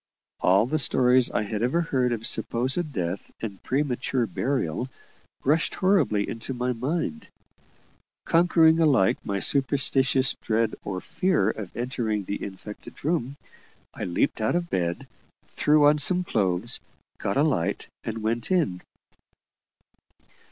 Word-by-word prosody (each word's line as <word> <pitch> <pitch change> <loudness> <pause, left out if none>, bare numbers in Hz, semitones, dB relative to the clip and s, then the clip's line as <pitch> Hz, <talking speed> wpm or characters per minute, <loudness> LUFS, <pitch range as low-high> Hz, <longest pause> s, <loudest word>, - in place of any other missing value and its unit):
All 95 +4 +4
the 155 +5 -1
stories 125 -1 +4
I 105 - -1
had 105 0 -4
ever 130 +9 +1
heard 130 -7 0
of 115 -1 -2
supposed 135 +7 0
death 90 -5 -4
and 100 -4 -6
premature 130 -2 -1
burial 125 - -2 0.5
rushed 155 +4 +1
horribly 185 - +2
into 115 +3 -5
my 125 +1 -1
mind. 125 - -3 1.0
Conquering 165 -1 +4
alike 135 -12 +3
my 100 -1 -2
superstitious 135 0 +2
dread 110 0 0
or 95 -2 -4
fear 165 - +1
of 100 -5 -8
entering 120 -4 -2
the 100 +2 -5
infected 100 +6 -9
room, 145 -5 -1 0.6
I - - -5
leaped 90 +7 0
out 110 - +1
of 175 -1 -2
bed, 85 -2 -1 0.4
threw 150 0 +3
on 150 +1 +4
some 180 +4 +4
clothes, 100 - 0 0.4
got - - -2
a - - +4
light, - - 0 0.2
and 110 0 -5
went 115 +2 -2
in. 155 - +1
125 Hz, 130 wpm, -25 LUFS, 105-150 Hz, 1.0 s, All